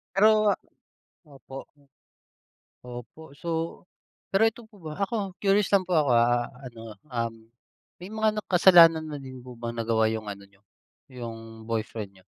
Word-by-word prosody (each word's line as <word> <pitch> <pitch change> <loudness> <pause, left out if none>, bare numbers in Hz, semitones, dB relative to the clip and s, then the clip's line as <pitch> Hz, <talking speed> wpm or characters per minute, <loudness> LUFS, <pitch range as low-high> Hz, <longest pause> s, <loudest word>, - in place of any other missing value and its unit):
Pero 215 +1 +5 0.7
opo, 135 -2 -11
m 145 - -26 1.0
opo. 125 +5 -9 0.2
So 165 0 -3 0.5
pero 200 +3 +4
'eto 225 +2 -2
po 205 - -18
ba, 155 -4 -7
ako 200 -2 -2
curious 200 0 +3
lang 195 - +5
po 185 - -13
ako, 145 -3 +2
ah, 120 +1 +3 0.2
ano, 115 -2 -10 0.2
um, 115 -2 -2 0.6
may 180 - -9
mga 215 -1 +1
na - - -2
kasalanan 170 -3 +7
na 145 - -5
din 130 -2 -10
po 125 -1 -11
ba 115 0 -4
nagawa 115 -1 +1
yung 110 -1 -2
ano 100 0 -9
niyo, 100 0 -29 0.5
yung 115 -2 -9
boyfriend 110 -3 -4
niyo? 95 - -20
130 Hz, 155 wpm, -27 LUFS, 115-185 Hz, 1.0 s, kasalanan